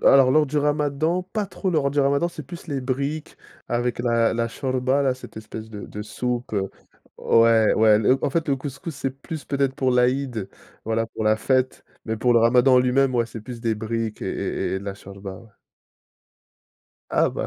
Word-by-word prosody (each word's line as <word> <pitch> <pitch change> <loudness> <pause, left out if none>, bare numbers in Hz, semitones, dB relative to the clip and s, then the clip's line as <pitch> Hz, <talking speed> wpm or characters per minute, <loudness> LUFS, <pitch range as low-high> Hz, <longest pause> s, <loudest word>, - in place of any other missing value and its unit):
alors, 135 -2 +7
lors 155 +1 +4
du 150 +2 -1
ramadan, 150 +4 +1
pas 200 +3 -3
trop 195 0 -3
lors 145 -5 +1
du 145 - +2
ramadan, 140 +4 +2
c'est 165 -2 -8
plus 170 +6 -10
les 140 -3 -2
briques 140 +4 -3 0.3
avec 120 0 -1
la 115 -2 +2
la 115 0 0
chorba, 130 +2 0
là, 130 -2 +2
cette 130 - -13
espèce 110 0 -8
de 105 -2 -7
de 105 - -7
soupe. 120 +3 -3 0.7
Ouais, 115 -1 +4
ouais, 110 -1 +5
le 125 +5 +3
en - - +1
fait, 160 +2 -1
le 140 - +2
couscous 140 +4 -6
c'est 135 0 -2
plus 140 +3 -8
peut-être 140 -1 0
pour 130 -1 +1
l'Aïd, 125 -4 +1 0.4
voilà, 115 +1 0
pour 110 - -6
la 110 0 +4
fête, 130 +3 0 0.2
mais 110 0 -2
pour 120 +3 +2
le 115 - +5
ramadan 125 +3 +5
en - - +7
lui-même, 130 +1 +2
ouais, 120 -1 +2
c'est 115 - -8
plus 120 0 -8
des 115 -2 0
briques 110 0 -3
et - - -3
et - - -2
et - - -2
de - - -10
la 100 -1 -4
chorba, 100 0 -9
ouais. 115 -2 -17 1.6
Ah - - +3
bah, - - -2
125 Hz, 205 wpm, -23 LUFS, 115-140 Hz, 1.6 s, alors